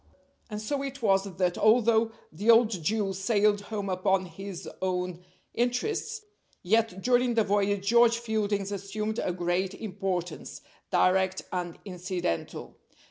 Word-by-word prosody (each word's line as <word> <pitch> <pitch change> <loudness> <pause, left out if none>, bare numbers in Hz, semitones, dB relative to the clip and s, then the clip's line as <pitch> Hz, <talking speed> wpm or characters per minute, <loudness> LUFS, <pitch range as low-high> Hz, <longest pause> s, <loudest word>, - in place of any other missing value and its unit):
And 210 -1 -4
so 275 +6 -2
it 275 -2 -6
was 195 -2 +3
that, 180 -1 0
although 225 0 +4 0.2
the 200 +8 -2
old 230 -1 +7
Jew 195 +2 -1
sailed 205 +1 +2
home 205 -1 -4
upon 185 0 +1
his 185 +1 -8
own 180 -1 -2 0.3
interests, 420 - -1 0.4
yet 200 -1 +1
during 245 -1 +3
the 225 - +4
voyage 205 -1 +1
George 235 0 +5
Fielding's 210 -3 -1
assumed 210 +3 -3
a - - -1
great 180 +2 -1
importance, 190 -5 -4 0.3
direct 185 0 +2
and 175 -2 -3
incidental. 180 - -4
200 Hz, 130 wpm, -28 LUFS, 185-225 Hz, 0.4 s, old